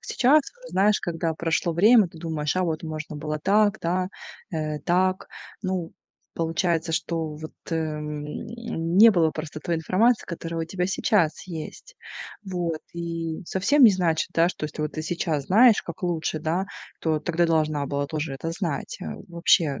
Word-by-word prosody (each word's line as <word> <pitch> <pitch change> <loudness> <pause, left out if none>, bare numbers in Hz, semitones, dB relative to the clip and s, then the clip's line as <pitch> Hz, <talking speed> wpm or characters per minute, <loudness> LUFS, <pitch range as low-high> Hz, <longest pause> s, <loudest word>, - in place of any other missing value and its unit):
Сейчас, 280 +4 +3 0.3
знаешь, 205 +2 +3
когда 165 -2 -2
прошло 165 +1 0
время, 210 +1 +6
ты 165 - -16
думаешь: 160 -1 -2
"А 185 - +2
вот 160 -2 -2
можно 155 -1 -5
было 155 +1 -3
так, 210 +1 +3
да, 180 +2 0 0.4
э, 155 -1 -2
так". 185 +3 +1 0.3
Ну, 185 -3 -2 0.4
получается, 165 0 0
что 160 -2 -2
вот, 155 +1 -8 0.2
э, - - 0
м, 150 -2 -3 0.7
не 225 +2 +9
было 165 -5 +3
просто 155 -1 -6
той 170 - -1
информации, 215 +9 +2
которая 165 -1 -4
у - - -2
тебя 180 +2 -2
сейчас 190 -5 +1
есть. 180 - -8 0.5
Вот. 175 -4 -2
И 165 0 -4
совсем 235 +10 +2
не 220 - +10
значит, 170 -4 +1
да, 170 +1 +4
что 155 - -5
если 155 0 -5
вот 150 - -2
ты 155 - -4
сейчас 155 -3 -2
знаешь, 225 +3 +6
как 170 +2 -8
лучше, 160 -2 -1
да, 170 +5 -1 0.3
то 155 -2 +1
тогда 170 +2 +1
должна 155 -3 +1
была 140 +1 -1
тоже 155 -1 -3
это 165 +4 -4
знать. 165 -6 -3 0.3
Вообще 170 -4 +2
165 Hz, 165 wpm, -25 LUFS, 155-185 Hz, 0.7 s, не